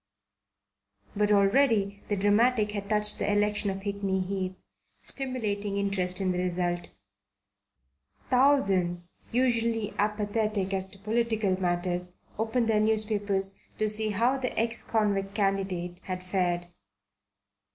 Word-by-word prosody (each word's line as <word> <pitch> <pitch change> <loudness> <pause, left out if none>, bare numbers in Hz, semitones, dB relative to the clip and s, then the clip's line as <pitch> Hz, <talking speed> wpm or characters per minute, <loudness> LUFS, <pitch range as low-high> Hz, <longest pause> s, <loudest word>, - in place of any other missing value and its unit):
But 210 0 +1
already 200 -1 +3
the 205 - 0
dramatic 210 +2 +2
had 200 -1 -5
touched 210 -1 +3
the - - 0
election 205 0 +1
of 195 0 -4
Hickney 200 -2 -1
Heath, 185 -1 -3 0.5
stimulating 210 -7 -1
interest 195 -2 -1
in 190 -1 0
the 180 - -2
result. 175 -1 -2 1.4
Thousands, 195 -10 +2
usually 230 -3 0
apathetic 210 -1 -1
as 190 -1 -1
to 195 - -16
political 215 -2 0
matters, 175 0 -1 0.2
opened 225 +1 0
their 220 -1 +3
newspapers 210 -3 +1 0.2
to 215 - +1
see 215 +1 +5
how 235 +6 +1
the 255 -1 -4
ex 230 +1 +2
convict 200 -3 -1
candidate 190 -3 -1
had 185 -1 -5
fared. 175 -2 -1
205 Hz, 120 wpm, -28 LUFS, 190-220 Hz, 1.4 s, see